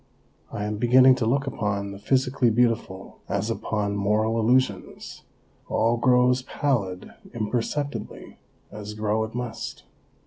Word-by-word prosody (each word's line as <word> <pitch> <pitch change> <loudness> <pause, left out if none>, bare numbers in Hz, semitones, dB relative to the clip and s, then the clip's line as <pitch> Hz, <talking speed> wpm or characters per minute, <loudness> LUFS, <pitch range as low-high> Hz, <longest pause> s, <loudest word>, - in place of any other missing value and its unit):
I 105 - -4
am 105 0 -3
beginning 130 +3 +6
to 115 -3 -1
look 135 +4 +1
upon 100 -6 -2
the 100 - -9
physically 130 +1 +1
beautiful 115 -5 -1
as 100 +3 -1
upon 105 -2 -2
moral 105 +3 +1
illusions; 115 -4 0 0.5
all 115 +1 +2
grows 125 +1 +3
pallid 115 -10 -2 0.2
imperceptibly, 120 +6 -4 0.3
as 105 +1 -8
grow 110 +1 0
it 110 - -10
must. 120 -2 -5
115 Hz, 125 wpm, -25 LUFS, 105-125 Hz, 0.5 s, beginning